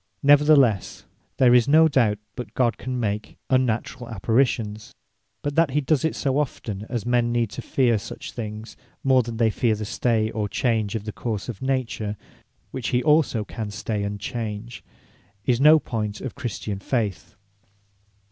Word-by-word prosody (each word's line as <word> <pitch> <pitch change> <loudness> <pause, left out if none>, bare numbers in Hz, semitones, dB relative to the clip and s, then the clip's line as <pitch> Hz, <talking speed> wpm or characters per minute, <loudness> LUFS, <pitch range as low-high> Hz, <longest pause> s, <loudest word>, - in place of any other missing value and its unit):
Neverthelesse, 145 - +4 0.3
there 125 -2 +5
is 125 0 +5
no 160 +3 +6
doubt, 120 -8 +2 0.2
but 125 - -7
God 120 -2 +1
can 130 0 -3
make 105 -2 -3
unnaturall 125 -1 0
Apparitions. 110 -1 0 0.5
But 145 - -2
that 165 0 +3
he 145 +3 0
does 140 0 +1
it 160 - 0
so 135 0 0
often, 110 -7 -4
as 120 -5 -3
men 120 -1 +2
need 120 -3 0
to - - -6
feare 120 -5 +2
such - - -8
things, 110 -1 -7 0.3
more 130 -1 +4
than 115 -1 -6
they 115 -1 +3
feare 110 +1 +1
the 105 0 -5
stay, 110 0 0
or 105 -2 -2
change, 110 -5 0
of 110 - -3
the 110 - -5
course 110 -1 -4
of 115 - -6
Nature, 125 -6 -2 0.5
which 125 -4 -4
he 125 -1 +1
also 150 -7 +3
can 110 -1 -5
stay, 105 0 -3
and 100 0 -3
change, 115 0 -5 0.6
is 125 0 +2
no 155 +2 +8
point 105 -7 -3
of 130 - -5
Christian 110 -6 -4
faith. 105 -3 -2
120 Hz, 165 wpm, -24 LUFS, 110-130 Hz, 0.6 s, no